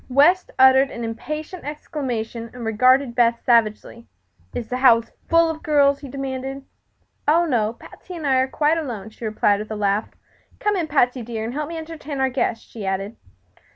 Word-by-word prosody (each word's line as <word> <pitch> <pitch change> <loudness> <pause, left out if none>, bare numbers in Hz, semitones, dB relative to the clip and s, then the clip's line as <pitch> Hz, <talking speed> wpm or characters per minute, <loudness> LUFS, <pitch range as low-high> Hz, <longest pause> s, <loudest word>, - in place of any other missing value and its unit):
West 300 +8 +4
uttered 265 +1 +6
an 235 - -6
impatient 305 +10 -5
exclamation 245 -6 -4
and 240 -2 -6
regarded 255 +3 +3
Beth 235 -1 +3
savagely. 230 0 +1 0.4
"Is 235 - -5
the 250 - -2
house 230 -3 +4 0.2
full 335 0 +5
of 320 -1 -4
girls?" 280 -2 +3
he 280 - -9
demanded. 270 0 -5 0.6
"Oh, 330 +3 +4
no; 230 -7 0
Patsy 360 +8 -12
and 320 -3 -6
I 265 -2 +3
are 260 0 +2
quite 300 +4 +1
alone," 220 -8 -6
she 225 - -9
replied, 210 -1 +2
with 215 - -6
a 215 - -4
laugh. 205 +1 0 0.5
"Come 415 0 +1
in, 345 -4 -1
Patsy 255 -4 +2
dear, 225 -1 -5
and 235 - -4
help 300 +1 -3
me 335 - -6
to - - -4
entertain 310 -3 -7
our 265 0 +2
guest," 240 -3 -2
she 220 - -9
added. 195 +3 -3
260 Hz, 190 wpm, -22 LUFS, 230-295 Hz, 0.6 s, uttered